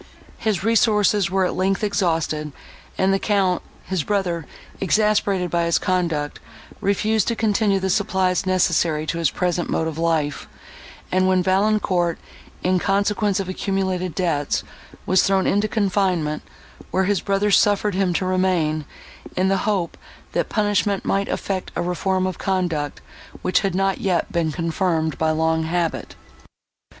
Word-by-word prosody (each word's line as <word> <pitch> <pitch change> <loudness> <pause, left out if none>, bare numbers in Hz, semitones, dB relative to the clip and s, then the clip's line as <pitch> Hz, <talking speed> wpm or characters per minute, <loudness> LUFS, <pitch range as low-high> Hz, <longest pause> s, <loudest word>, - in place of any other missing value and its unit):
His 215 -4 -1
resources 210 -3 +3
were, 190 +1 +1
at - - -1
length, 190 +2 0
exhausted; 165 -7 0 0.5
and 190 +1 +2
the 195 - +1
Count, 195 -3 +1 0.2
his 185 -5 -2
brother, 180 -5 -1 0.3
exasperated 200 -2 +1
by 170 -1 +1
his 170 - +2
conduct, 170 -6 -1 0.4
refused 210 +1 +1
to 235 - +1
continue 210 -2 +2
the 190 0 -1
supplies 190 -2 +1
necessary 170 -4 +2
to 165 +2 -2
his 165 -3 +2
present 175 0 -1
mode 160 - 0
of 160 0 -5
life, 155 -4 0 0.6
when 185 0 +3
Valancourt, 190 -3 +1 0.5
in 185 0 +2
consequence 200 +1 +1
of 195 - -3
accumulated 185 -2 -2
debts, 160 -6 0 0.4
was 185 +1 +4
thrown 195 -1 +2
into 205 +2 +2
confinement, 185 -7 0 0.5
where 190 - +1
his 200 0 +1
brother 200 +1 +1
suffered 205 0 +3
him 190 -1 +1
to 185 - 0
remain, 180 -5 +1 0.5
in 185 +1 +2
the 195 - +2
hope, 190 -5 -1 0.3
that - - -1
punishment 205 -2 0
might 200 0 0
effect 190 -2 -3
a - - -1
reform 185 +1 0
of 185 -2 -3
conduct, 175 -7 -1 0.4
which 185 - +3
had 195 -3 -1
not 195 0 +1
yet 185 +2 0
been 170 -4 0
confirmed 165 -1 -1
by 160 - +2
long 160 +1 +1
habit. 165 +1 -2
185 Hz, 145 wpm, -22 LUFS, 170-195 Hz, 0.6 s, was